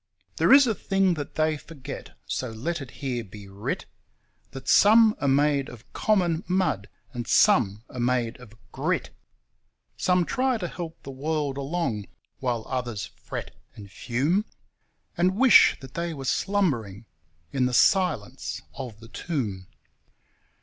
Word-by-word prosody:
There - - +3
is 275 0 +9
a 230 - +1
thing 195 -2 +1
that 150 -3 -6
they 155 -1 +1
forget, 145 -3 -9
so 130 - -3
let 140 +9 -3
it 135 - -8
here 125 -4 -4
be 100 -1 -12
writ, 100 +2 -4 0.6
That 135 0 -10
some 220 +1 +6
are 140 - +1
made 140 0 +2
of 120 -2 -14
common 180 -6 +1
mud, 180 - 0 0.2
and 120 -1 -5
some 115 - +4
are 125 - -8
made 120 -1 0
of 115 -3 -14 0.2
GRIT; - - -1 0.9
Some 180 -1 +2
try 255 +4 +1
to 180 -5 -3
help 165 -1 -7
the 135 - -7
world 145 0 -2
along 135 - -2 0.3
while 120 -4 -2
others 120 -6 -3
fret - - -7 0.2
and 100 -2 -11
fume 150 - 0 0.7
And 180 +2 +2
wish 260 +1 +7
that 130 - -11
they 170 -1 -3
were 135 -2 -7
slumbering 125 - 0 0.5
in 130 -2 +1
the - - -2
silence 135 - +1
of 120 -5 -8
the 115 - -12
tomb. 110 - -4
135 Hz, 145 wpm, -26 LUFS, 120-175 Hz, 0.9 s, is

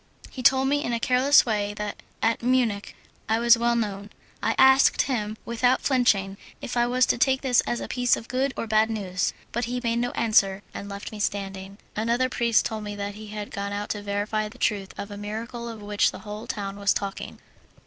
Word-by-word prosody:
He 260 - -6
told 265 +1 +4
me 290 +1 +1
in 240 - -2
a 230 - 0
careless 255 +4 +5
way 205 -3 -1
that 210 -1 -5 0.2
at 225 +1 +2
Munich 235 -5 0 0.3
I 220 - +3
was 235 +1 +6
well 235 0 +1
known. 205 -3 -3 0.3
I - - 0
asked 265 +1 +6
him 215 -5 -2
without 245 +2 +1
flinching 200 -7 +2 0.2
if 245 - -6
I 240 0 +3
was 250 +1 +3
to - - 0
take 265 +1 +3
this 250 -3 +3
as 240 - -1
a - - -5
piece 245 -1 +2
of 225 - -9
good 265 +2 0
or - - -2
bad 220 0 +3
news; 190 -5 -1 0.2
but 240 +2 -1
he 245 +1 -3
made 235 0 0
no 245 +1 0
answer, 200 -3 +2
and 200 - -7
left 200 +1 -7
me 215 - -8
standing. 195 -1 -3 0.2
Another 235 +4 +1
priest 235 -2 +2
told 220 -1 -3
me 205 0 -5
that 205 0 -4
he 215 +1 -10
had 210 0 -6
gone 200 0 -4
out 205 +1 -4
to 205 - -3
verify 205 +1 -2
the 240 - -15
truth 200 -5 -1
of 200 - -6
a 205 - -7
miracle 230 +3 -5
of 220 -2 -9
which 205 0 +2
the - - -8
whole 210 +1 -7
town 200 -1 -4
was 200 0 +2
talking. 195 -1 -4
220 Hz, 220 wpm, -25 LUFS, 205-240 Hz, 0.3 s, was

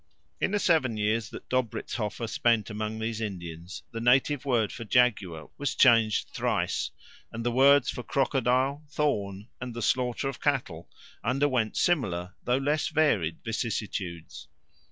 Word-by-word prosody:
In - - +1
the 205 - +1
seven 155 - +2
years 105 +1 0
that - - -10
Dobrizhoffer 120 -2 -2
spent 115 -2 +1
among 110 +1 -3
these 110 0 -3
Indians 85 -4 -6
the 115 - -5
native 130 +3 +3
word 115 -6 +1
for 115 - -7
jaguar 100 -9 +1
was 145 -2 -1
changed 115 -4 +4
thrice, - - -1 0.4
and 115 +1 -5
the 120 - +2
words 135 +2 +5
for - - -6
crocodile, 135 +2 +1
thorn, 105 -9 -1
and 125 -2 -5
the 120 - -4
slaughter 125 +3 0
of 135 -2 -5
cattle 120 - -1 0.3
underwent 125 -2 +1
similar 95 - 0
though 125 +1 +2
less 145 +3 0
varied 110 - +1
vicissitudes. 95 -9 -4
115 Hz, 140 wpm, -28 LUFS, 105-135 Hz, 0.4 s, words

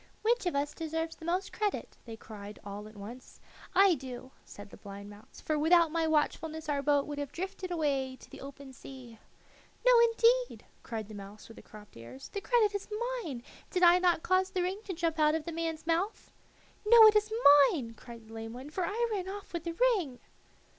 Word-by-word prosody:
"Which 465 -3 +1
of 345 - -1
us 285 +1 -1
deserves 325 0 -4
the 320 - -11
most 360 +3 -2
credit?" 420 -2 -3
they 225 -2 -8
cried 210 -1 -10
all 205 +1 -7
at 215 - -15
once. 235 +6 -11 0.4
"I 390 -1 +6
do," 260 -3 -7
said 205 0 -12
the - - -12
blind 200 0 -10
mouse, 205 +1 -15
"for 310 -1 -1
without 330 +1 +4
my 330 0 0
watchfulness 315 +1 -1
our 285 -1 0
boat 285 0 +2
would 290 -1 -6
have 285 -1 -4
drifted 370 +2 -5
away 280 -6 -1
to - - -16
the - - -12
open 275 0 -10
sea." 245 -3 -12 0.7
"No, - - +7
indeed," 470 +1 +3 0.2
cried 220 -3 -6
the 215 - -11
mouse 205 +1 -10
with 225 - -14
the - - -10
cropped 210 -1 -15
ears; 120 +3 -11
"the 400 - -5
credit 440 -3 +2
is 405 -1 -4 0.4
mine. 260 -8 -6 0.3
Did 365 -1 -1
I 350 +1 +7
not 350 -3 +2
cause 370 +1 +2
the 370 -2 -1
ring 380 +3 -3
to 385 - -4
jump 330 -1 -2
out 305 0 +4
of 320 -1 -3
the 335 - -4
man's 325 -1 -4
mouth?" 340 +6 -1 0.5
"No, 445 +1 +8
it 430 0 +7
is 425 +1 +2 0.4
mine," 240 -8 -4
cried 230 0 -13
the 225 - -13
lame 225 0 -7
one, 260 +4 -9
"for 370 - -2
I 465 +5 0
ran 380 -3 -3
off 400 -1 -8
with 340 -1 -4
the 335 - -3
ring." 370 - +1
315 Hz, 210 wpm, -30 LUFS, 245-370 Hz, 0.7 s, No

